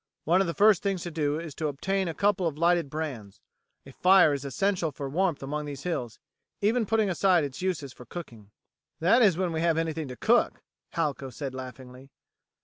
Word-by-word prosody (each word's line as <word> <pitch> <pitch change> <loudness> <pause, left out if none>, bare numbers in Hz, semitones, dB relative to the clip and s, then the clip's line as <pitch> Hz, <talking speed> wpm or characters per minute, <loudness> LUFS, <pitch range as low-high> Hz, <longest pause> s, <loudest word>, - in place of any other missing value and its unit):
One 175 +4 +3
of 195 - 0
the 170 - -3
first 205 +1 +5
things 195 -3 -1
to 175 - -5
do 150 -1 -1
is 165 -3 -7
to 155 +2 -2
obtain 190 +7 -1
a 165 - -4
couple 200 -3 +2
of 150 -3 -4
lighted 170 -2 +2
brands. 135 -10 -6 0.5
A 135 - -11
fire 180 0 +5
is 140 -1 -3
essential 170 +4 0
for 140 0 -6
warmth 165 0 0
among 150 +2 -3
these 140 -2 -7
hills, 125 -11 -3 0.4
even 220 +2 +1
putting 220 0 +2
aside 185 -2 +3
its 140 +1 -5
uses 165 -8 -2
for 125 - -13
cooking." 115 - -9 0.5
"That 200 +10 +4
is 195 -7 +5
when 185 -2 0
we 160 - -1
have 165 -1 +2
anything 160 -2 -2
to 125 - -7
cook," - - +2 0.3
Halco 140 -2 -2
said 135 0 -5
laughingly. 130 0 -9
160 Hz, 200 wpm, -27 LUFS, 140-185 Hz, 0.5 s, first